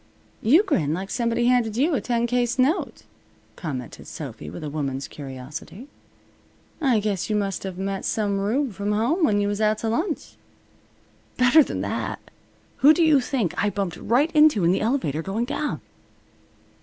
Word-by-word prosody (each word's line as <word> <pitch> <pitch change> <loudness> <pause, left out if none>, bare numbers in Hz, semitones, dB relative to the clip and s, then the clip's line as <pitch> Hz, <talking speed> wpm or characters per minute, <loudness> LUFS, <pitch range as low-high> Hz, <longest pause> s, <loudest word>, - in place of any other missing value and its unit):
"You 300 - +5
grin 160 - 0
like 190 +3 -5
somebody 235 -1 0
handed 240 -3 +2
you 305 +6 +2
a 255 - 0
ten 235 +1 0
case 245 0 0
note," 275 +8 0 0.5
commented 135 -7 -6
Sophy, 75 - -7
with 90 - -8
a 150 - -4
woman's 140 -3 -3
curiosity. 145 - -9 1.0
"I 255 -7 +3
guess 205 -3 -2
you 215 - +1
must 195 -2 -2
of 185 -2 -5
met 195 0 -3
some 205 -2 0
rube 235 +5 0
from 200 +2 -2
home 245 - +1
when 205 -8 +3
you 205 - +1
was 205 +1 -2
out 215 0 +2
t' 225 - -6
lunch." 310 - -2 1.0
"Better 250 +5 +6
than - - -4
that! - - -3 0.6
Who 300 +3 +6
do 340 - +3
you 305 -4 +5
think 245 - -1
I 205 - +2
bumped 195 -3 -3
right 270 +9 +1
into 300 - +5
in 170 - +4
the 190 - +1
elevator 215 - 0
going 200 +7 -2
down?" 290 +2 -3
215 Hz, 170 wpm, -24 LUFS, 190-255 Hz, 1.0 s, Better